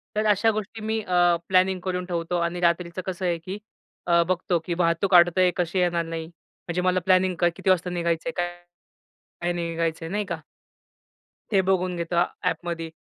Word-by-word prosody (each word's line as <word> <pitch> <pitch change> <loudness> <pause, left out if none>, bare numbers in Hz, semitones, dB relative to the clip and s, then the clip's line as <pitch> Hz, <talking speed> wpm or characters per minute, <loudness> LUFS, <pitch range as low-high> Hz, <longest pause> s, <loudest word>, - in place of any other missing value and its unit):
तर 215 0 +1
अश्या 220 +3 +3
गोष्टी 215 +1 -5
मी 220 +1 -1
अ, 175 -2 +3
प्लॅनिंग 185 0 +3
करून 180 -1 -2
ठेवतो 175 0 -2
आणि 170 +1 -1
रात्रीचं 170 +1 0
कसं 185 0 -4
आहे 170 -1 +1
की 185 +5 -6 0.5
अ, 170 0 +5
बघतो 180 -1 0
की 175 - -2
वाहतूक 170 +2 +2
अडतय 175 +1 +5
कशी 180 +1 0
येणार 170 -2 +1
नाही. 165 -1 -5
म्हणजे 170 +1 -7
मला 185 0 +2
प्लॅनिंग 185 -1 +3
क 175 - +3
किती 190 - -2
वाजता, 180 -1 +2
काय - - -5
निघायचंय, 170 +7 -1
काय? 175 -4 -3 0.9
काही 175 0 0
नाही 170 -1 -3
निघायचय, 165 0 -2
नाही 205 +3 -2
का? 170 -4 -4 1.1
हे 195 -2 +4
बघून 185 -1 0
घेतो 170 0 -3
अ, 170 - +5 0.2
ॲपमध्ये. 165 0 -2
175 Hz, 185 wpm, -25 LUFS, 170-185 Hz, 1.1 s, अ